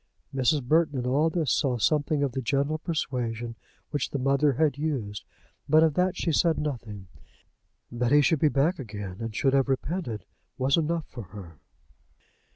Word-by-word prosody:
Mrs. 135 +2 +2
Burton 155 +2 +2
in 125 - -2
all 145 +6 +2
this 160 -5 0
saw 130 -4 +1
something 145 +5 +1
of 140 - 0
the 130 - -3
gentle 140 +5 0
persuasion 120 -8 -3 0.4
which 145 -4 -1
the - - -3
mother 140 +2 +2
had 150 +1 +2
used, 130 -10 -3 0.5
but 155 +2 +6
of 160 -2 +3
that 180 +3 +1
she 165 - 0
said 165 +1 +2
nothing. 115 -9 -4 0.9
That 120 +1 -1
he 145 0 +6
should 160 +1 +3
be 155 - +4
back 150 +6 +1
again, 105 -6 -6
and 115 -2 -5
should 135 +2 +2
have 135 0 +2
repented, 135 - -2 0.3
was 135 +1 +2
enough 165 0 0
for 120 - -8
her. 90 -5 -11
135 Hz, 170 wpm, -27 LUFS, 120-155 Hz, 0.9 s, but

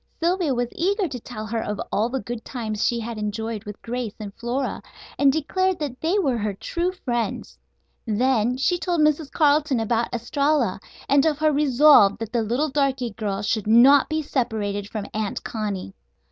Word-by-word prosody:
Sylvia 340 -4 +1
was 240 0 -1
eager 390 +3 0
to 260 -5 -6
tell 220 -2 -7
her 225 +1 -2
of 210 -1 -4
all 220 +3 +1
the 265 +2 -2
good 235 +2 -6
times 220 -4 -4
she 235 - +1
had 230 -1 -5
enjoyed 215 +1 -3
with 210 -1 -8
Grace 240 -2 -4
and 205 -2 -7
Flora, 245 +5 -3 0.4
and 280 -1 +5
declared 370 +5 0
that 280 -5 -5
they 335 +6 +1
were 270 - +1
her 205 -1 -2
true 345 - -2
friends. 240 -10 -4 0.5
Then 245 +2 +1
she 350 +7 +1
told 345 -1 0
Mrs. 300 -1 +2
Carleton 290 -3 +2
about 230 +1 0
Estralla, 260 -1 0 0.3
and 280 0 +4
of 305 -2 +1
her 310 0 +2
resolve 285 -7 +5
that 225 +1 -6
the 235 - +2
little 245 +8 0
darky 265 -4 0
girl 205 -1 -3
should 210 0 -1
not 255 +5 +6
be 310 0 -1
separated 210 -7 -2
from 215 -3 -4
Aunt 215 -2 -3
Connie. 205 - -4
245 Hz, 180 wpm, -23 LUFS, 220-295 Hz, 0.5 s, not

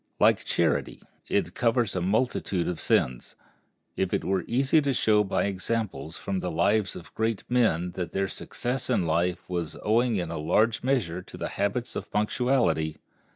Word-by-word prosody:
Like - - +4
charity, - - 0 0.3
it - - 0
covers 115 -3 +1
a 90 - 0
multitude 95 -2 0
of 90 -2 -3
sins. 60 -1 0 0.6
It 95 -1 0
were 95 -2 0
easy 135 +6 +3
to 140 -2 0
show 105 -2 +4
by 100 - 0
examples 100 -3 -2
from 95 -2 -3
the 90 - -3
lives 95 +4 +1
of 85 - -11
great 110 -1 -1
men 100 -8 +2
that 90 0 -4
their 95 0 0
success 125 +7 -3
in 115 -8 +2
life 85 +3 0
was 85 -3 -3
owing 115 +2 +2
in 85 -4 -2
a 85 - -3
large 110 +8 +2
measure 115 -10 0
to - - -12
their - - -3
habits 120 +5 -2
of - - -5
punctuality. 105 - +1
100 Hz, 165 wpm, -27 LUFS, 90-115 Hz, 0.6 s, Like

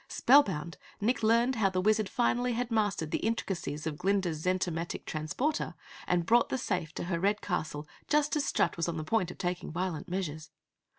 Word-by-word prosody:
Spellbound, 185 - +3 0.2
Nick 235 +5 +1
learned 235 +3 +3
how 200 -3 +3
the 185 -1 -1
Wizard 215 +1 +2
finally 245 +1 +1
had 240 +1 -2
mastered 205 -8 0
the - - 0
intricacies 180 -9 -2
of 150 -2 -3
Glinda's 185 -5 0
zentomatic 180 -2 -1
transporter 160 - -2 0.3
and 175 -1 +1
brought 235 +4 +4
the - - 0
safe 180 -9 -2
to - - -3
her 170 -1 -1
red 205 +4 +2
castle 155 -6 -3 0.2
just 300 0 +2
as 300 - +1
Strut - - +1
was 170 - 0
on 165 - -3
the 155 - -3
point 185 +1 +1
of - - -9
taking 180 -1 -3
violent 175 -2 -3
measures. 160 -4 -4
185 Hz, 185 wpm, -30 LUFS, 165-225 Hz, 0.3 s, brought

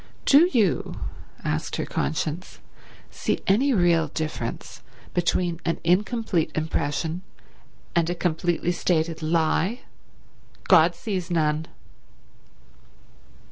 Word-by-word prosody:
"Do 310 +6 +6
you," 215 -8 +1 0.4
asked - - -2
her - - -2
conscience, 150 - -3 0.5
"see - - -1
any 250 +9 +3
real 175 -7 +3
difference 155 -6 -5 0.3
between 175 -1 0
an 165 - -1
incomplete 190 0 +1
impression 155 +2 -1 0.7
and 170 -1 +2
a 175 - -1
completely 175 0 0
stated 165 -2 0
lie? 165 +7 +1 0.9
God - - +6
sees 190 -6 -3
none." 155 -2 +1
170 Hz, 95 wpm, -25 LUFS, 160-185 Hz, 0.9 s, Do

